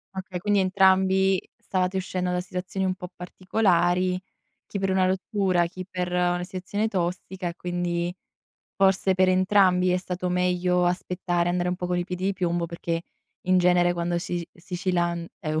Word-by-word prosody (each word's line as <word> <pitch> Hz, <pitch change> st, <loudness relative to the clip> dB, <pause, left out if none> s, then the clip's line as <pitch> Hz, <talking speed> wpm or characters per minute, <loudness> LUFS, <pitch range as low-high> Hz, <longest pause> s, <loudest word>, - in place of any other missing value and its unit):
Okay, 190 Hz, -1 st, -5 dB
quindi 205 Hz, +1 st, +2 dB
entrambi 190 Hz, 0 st, +4 dB, 0.2 s
stavate 185 Hz, 0 st, -1 dB
uscendo 180 Hz, -1 st, -2 dB
da 180 Hz, 0 st, 0 dB
situazioni 185 Hz, +1 st, -4 dB
un 185 Hz, 0 st, 0 dB
po' 180 Hz, -1 st, -8 dB
particolari, 180 Hz, -1 st, +1 dB, 0.5 s
chi 200 Hz, -, -5 dB
per 195 Hz, 0 st, 0 dB
una 190 Hz, 0 st, +3 dB
rottura, 185 Hz, -2 st, +1 dB
chi 185 Hz, +1 st, -8 dB
per 180 Hz, -1 st, -3 dB
una 175 Hz, 0 st, +1 dB
sezione 195 Hz, +3 st, -2 dB
tossica 185 Hz, -1 st, -3 dB
e 170 Hz, -, -8 dB
quindi 175 Hz, -1 st, -2 dB, 0.6 s
forse 195 Hz, 0 st, +3 dB
per 185 Hz, 0 st, +3 dB
entrambi 185 Hz, -1 st, +4 dB
è 180 Hz, -, +3 dB
stato 180 Hz, 0 st, -3 dB
meglio 180 Hz, 0 st, +2 dB
aspettare, 175 Hz, -1 st, 0 dB
andare 180 Hz, 0 st, 0 dB
un 180 Hz, -, -1 dB
po' 180 Hz, -, -3 dB
con 180 Hz, 0 st, 0 dB
i 175 Hz, -, -1 dB
piedi 180 Hz, 0 st, -5 dB
di 200 Hz, -, +2 dB
piombo 175 Hz, -2 st, -1 dB
perché 170 Hz, 0 st, -3 dB, 0.4 s
in 185 Hz, 0 st, +4 dB
genere 175 Hz, 0 st, +4 dB
quando 175 Hz, 0 st, -1 dB
si 175 Hz, -, -4 dB
is 170 Hz, -, -3 dB, 0.2 s
si 180 Hz, -1 st, -5 dB
ci 185 Hz, 0 st, -1 dB
lan 170 Hz, -1 st, 0 dB
eu 155 Hz, 0 st, -1 dB
180 Hz, 175 wpm, -25 LUFS, 175-190 Hz, 0.6 s, entrambi